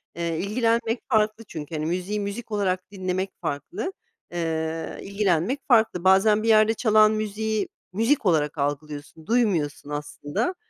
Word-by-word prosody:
Eee, 170 -1 -2
ilgilenmek 230 +2 +1
farklı 215 -1 +2
çünkü, 160 -1 -6
hani, 155 0 -2
müziği 185 +5 -2
müzik 205 +3 -5
olarak 190 -2 -1
dinlemek 185 0 -2
farklı, 360 - -3 0.4
eee, 160 -1 -2
ilgilenmek 200 - 0
farklı. 220 -8 +3
Bazen 210 +3 +5
bir - - -1
yerde 220 0 +5
çalan 215 -2 +5
müziği, 215 -1 -1 0.3
müzik 230 +5 +2
olarak 155 -4 +2
algılıyorsun, 145 +2 -4
duymuyorsun 180 -12 +1
aslında, 145 - -3
200 Hz, 130 wpm, -25 LUFS, 160-220 Hz, 0.4 s, Bazen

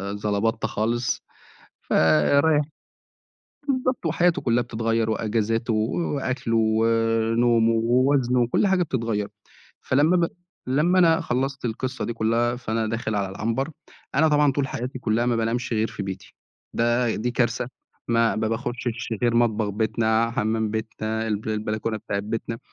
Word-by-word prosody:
زلبطتة 105 +2 -1
خالص 120 +3 -1 0.6
فرايح 140 - +3 1.1
بالضبط 255 -7 0
وحياته 175 +3 +2
كلّها 120 0 +2
بتتغيّر 115 -1 -1
وإجازاته 115 +1 0
و 110 +2 0 0.2
وأكله 130 -4 -1
ونومه 115 +1 +2
ووزنه 125 +2 +2
وكل 120 - +2
حاجة 190 -2 +3
بتتغيّر 115 -8 -2 0.5
فلمّا 150 +7 +3
ب 170 -1 +2 0.4
لمّا 155 +8 +2
أنا 165 -2 +5
خلّصت 135 +2 -2
القِصّة 130 +3 -3
دي 120 - -2
كلّها 115 +2 +1
فأنا 115 -2 -2
داخل 110 0 -2
على 100 -2 -1
العنبر 115 +9 -2 0.4
أنا 160 +3 +4
طبعًا 150 -2 +3
طول 135 0 -1
حياتي 130 +2 -5
كلّها 120 0 0
ما 120 - +2
بانامش 115 +2 -1
غير 110 -1 +1
في - - -6
بيتي 95 -3 -7 0.4
ده 120 0 +1
دي 120 +3 -1
كارثة 120 0 0 0.4
ما 115 -1 +2
ما 110 0 0
باخشش 120 +1 -3
غير 120 -1 +2
مطبخ 110 -3 +2
بيتنا 110 +2 +1
حمام 110 -2 -1
بيتنا 110 0 -3
الب 105 0 -2
البلكونة 110 +1 -2
بتاعة 100 -1 -3
بيتنا 115 +2 -4
115 Hz, 135 wpm, -24 LUFS, 110-125 Hz, 1.1 s, أنا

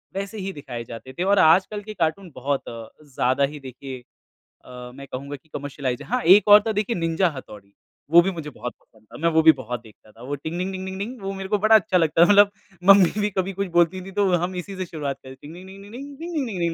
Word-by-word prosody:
वैसे 200 +2 -5
ही 195 -1 -5
दिखाए 125 -5 -7
जाते 115 +3 -10
थे। 175 - -3
और 200 +1 +3
आजकल 190 +6 +4
के 215 +1 -8
कार्टून 175 0 -2
बहुत 135 +2 -2
अ, 115 -1 -9
ज़्यादा 130 -1 0
ही 150 - -8
देखिए 130 0 -9 0.7
अ, 125 -1 -10
मैं 140 0 -10
कहूँगा 140 +3 -6
कि 155 +3 -18
कमर्शियलाइज़्ड 135 -3 -4
हाँ, 250 +2 0
एक 195 +5 +6
और 210 0 +9
था - - +1
देखिए 215 +3 -1
निंजा 165 +2 +1
हथौड़ी। 100 -6 -12 0.4
वो 170 +1 +8
भी 195 +2 -1
मुझे 160 -4 -7
बहुत 125 -2 -7
पसंद 110 -1 -27
था, - - -10
मैं 170 +2 +1
वो 160 -1 +3
भी 160 - +9
बहुत 125 -4 -6
देखता 110 -1 -19
था। 115 - -18
वो 140 +3 -4
टिंग 160 +4 -6
डिंग 185 +2 -2
डिंग 190 0 -6
डिंग 190 0 -6
डिंग, 230 +3 -6
वो 195 0 -4
मेरे 195 0 -7
को 210 - +2
बड़ा 215 +2 +5
अच्छा 210 -3 +3
लगता, 165 0 +4
मतलब 205 +1 +6 0.3
मम्मी 195 -2 +7
भी 205 - +1
कभी 190 +1 -1
कुछ 200 +1 -3
बोलती 175 +2 +2
थी 195 - -9
तो 200 0 +1
हम 175 +2 -2
इसी 185 +2 -6
से 185 - -3
शुरुआत 145 -5 -5
करें 130 0 -11
टिंग 150 +2 -11
डिंग 185 +2 -12
डिंग 195 +1 -12
डिंग 205 +2 -14
डिंग, 280 +3 -9
टिंग 340 +2 -6
डिंग 280 -5 -1
डिंग 170 -1 0
170 Hz, 255 wpm, -23 LUFS, 140-195 Hz, 0.7 s, और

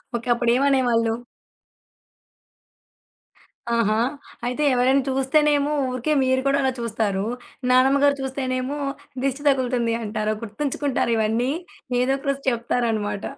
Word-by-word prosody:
Okay. 235 0 -4
అప్పుడేమనేవాళ్ళు? 240 -2 +2 2.6
ఆహా! 215 -2 +2 0.5
అయితే 250 +5 -2
ఎవరైనా 260 +2 +3
చూస్తేనేమో 285 +2 +2 0.2
ఊరికే 255 +4 -1
మీరు 260 0 +2
కుడా 275 0 +3
అలా 265 -1 +1
చూస్తారు. 215 -4 -1 0.5
నానమ్మ 260 +2 +5
గారు 285 0 +4
చూస్తేనేమో 260 +1 -2 0.5
దిష్టి 275 +1 -1
తగులుతుంది 250 -4 +1
అంటారా 215 0 -2
గుర్తుంచుకుంటారు 265 +2 -1
ఇవన్నీ, 225 +4 +1 0.5
ఏదోక 270 +2 0
రోజు 275 0 -2
చెప్తారన్నమాట. 230 -4 -1
255 Hz, 100 wpm, -23 LUFS, 230-270 Hz, 2.6 s, నానమ్మ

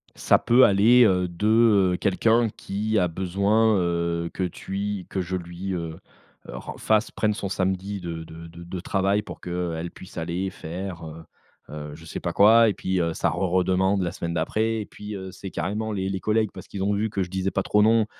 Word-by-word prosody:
Ça - - +4
peut 125 +2 +4
aller, 115 +5 +6
heu, 90 -3 +2
de, 85 +4 -2 0.5
heu, - - -1
quelqu'un 115 +4 +2
qui 105 +2 -2
a 90 - +2
besoin, 100 +5 +2
heu, 85 -1 -1
que 95 - -3
tu 95 +2 -4
que 95 - -2
je 90 +1 -3
lui, 90 +2 -5
heu, 85 -2 -4 0.5
ren - - -7
fasse 110 0 +2
prenne 105 -1 0
son 100 -2 -4
samedi 95 +1 -2
de 85 -2 -5
de 80 +1 -11
de 85 +2 -8
travail 100 +3 0
pour - - -10
que, - - -7
heu, 90 -1 -2
elle 85 +2 -4
puisse 95 - -13
aller 90 +3 -2
faire, 90 +1 -6
heu, 80 +1 -9 0.5
heu, 75 -1 -7
je 80 - -13
sais 80 - -6
pas - - -3
quoi 115 +3 +6
et 105 - -2
puis, 95 0 -1
heu, 85 -1 -1
ça 85 - +1
re 90 - -4
redemande 95 +2 +2
la 85 - -2
semaine 85 0 -4
d'après 110 +7 0
et - - -6
puis, 105 0 -8
heu, 95 -1 -7
c'est 95 - -8
carrément 105 +6 -3
les 95 -2 -2
les 95 - -2
collègues, 110 +1 +1
parce 95 - -10
qu'ils 95 -1 -4
ont 100 +1 +1
vu 105 +2 0
que 100 -1 -1
je 90 - -7
disais 95 0 -1
pas 95 - -1
trop 105 +1 +3
non, 110 0 +4
95 Hz, 220 wpm, -25 LUFS, 85-105 Hz, 0.5 s, aller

